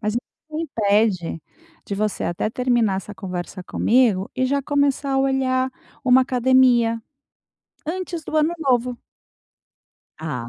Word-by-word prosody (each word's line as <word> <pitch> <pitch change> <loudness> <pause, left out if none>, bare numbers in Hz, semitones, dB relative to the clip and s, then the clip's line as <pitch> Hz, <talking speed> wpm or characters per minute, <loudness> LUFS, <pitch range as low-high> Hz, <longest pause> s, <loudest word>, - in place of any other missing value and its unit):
mas 215 0 -1
o 240 - +2
que 310 +4 -13
impede 205 - +1 0.4
de 200 - -3
você 210 +1 -1
até 175 +5 -1
terminar 240 -5 +1
essa 200 +2 -6
conversa 185 -1 -6
comigo 220 -3 +2
e 260 - +1
já 280 +1 0
começar 285 -1 +1
a 270 - +2
olhar 260 -1 +1 0.3
uma 255 0 +6
academia, 250 -2 +3 0.9
antes 350 -1 -4
do 310 - -5
ano 310 +2 +3
novo. 250 -4 +1 1.2
Ah 125 -7 -4
250 Hz, 130 wpm, -22 LUFS, 205-270 Hz, 1.2 s, uma